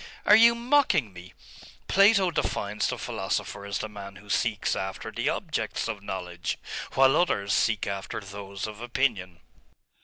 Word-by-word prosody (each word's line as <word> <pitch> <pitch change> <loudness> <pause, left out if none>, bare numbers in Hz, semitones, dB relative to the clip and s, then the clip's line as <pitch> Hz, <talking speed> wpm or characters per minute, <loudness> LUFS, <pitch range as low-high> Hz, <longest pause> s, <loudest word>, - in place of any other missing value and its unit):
'Are 210 - +8
you 235 +1 +7
mocking 235 - +2
me? 90 0 -11 0.6
Plato 195 -2 +5
defines 105 -9 -1
the - - -3
philosopher 100 0 -3
as 100 - -2
the 110 - -4
man 100 -2 -9
who 105 0 -10
seeks 105 0 0
after 95 0 -5
the - - -1
objects - - -2
of 110 -3 -4
knowledge, 90 -4 -4 0.4
while 135 0 +5
others 100 - +1
seek 110 -3 +2
after 100 0 -4
those 100 -1 -7
of 110 0 -8
opinion. 115 -9 -1
105 Hz, 150 wpm, -27 LUFS, 100-140 Hz, 0.6 s, Are